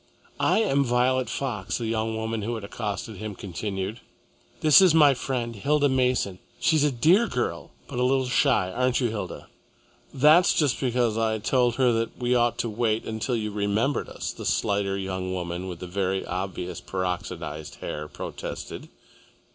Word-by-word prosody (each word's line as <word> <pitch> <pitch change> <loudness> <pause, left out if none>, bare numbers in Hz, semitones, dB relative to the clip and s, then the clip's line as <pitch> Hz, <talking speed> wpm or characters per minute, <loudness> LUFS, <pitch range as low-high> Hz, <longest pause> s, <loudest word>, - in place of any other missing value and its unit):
"I 220 - +3
am 140 -9 +2
Violet 125 +1 +1
Fox," 110 -9 -3
the 120 - -4
young 110 0 -1
woman 110 0 -2
who 115 +3 -2
had 110 - -6
accosted 105 0 -5
him 110 0 -6
continued. 100 +3 -4 0.6
"This 160 +2 +7
my 150 -3 +7
friend, 120 -3 -3
Hilda 145 +7 +2
Mason. 125 -8 +1 0.2
She's 155 -3 +3
a 150 - +3
dear 170 - +4
girl - - -3 0.2
but 130 -4 -5
a - - +2
little 130 +1 +2
shy, 125 -6 +2
aren't 125 +3 +1
you, 125 -3 +1
Hilda?" 105 -2 -5 0.7
"That's 155 +6 +5
just 145 -6 +2
because 120 -3 +1
I 110 -1 +1
told 120 +2 +1
her 125 -2 +3
that 115 0 -1
we 125 0 0
ought 120 -1 +2
to - - -1
wait 110 0 0
until 110 +3 -2
you 105 -2 -2
remembered 105 +7 0
us," - - -4
the - - -9
slighter 100 -1 0
young 95 -1 -3
woman, 90 +1 -4
with 90 -2 -6
the - - -4
very 95 +1 -1
obvious 90 -1 -4
peroxidised 90 -4 -4
hair, 75 0 -5
protested. - - -7
115 Hz, 165 wpm, -26 LUFS, 100-130 Hz, 0.7 s, This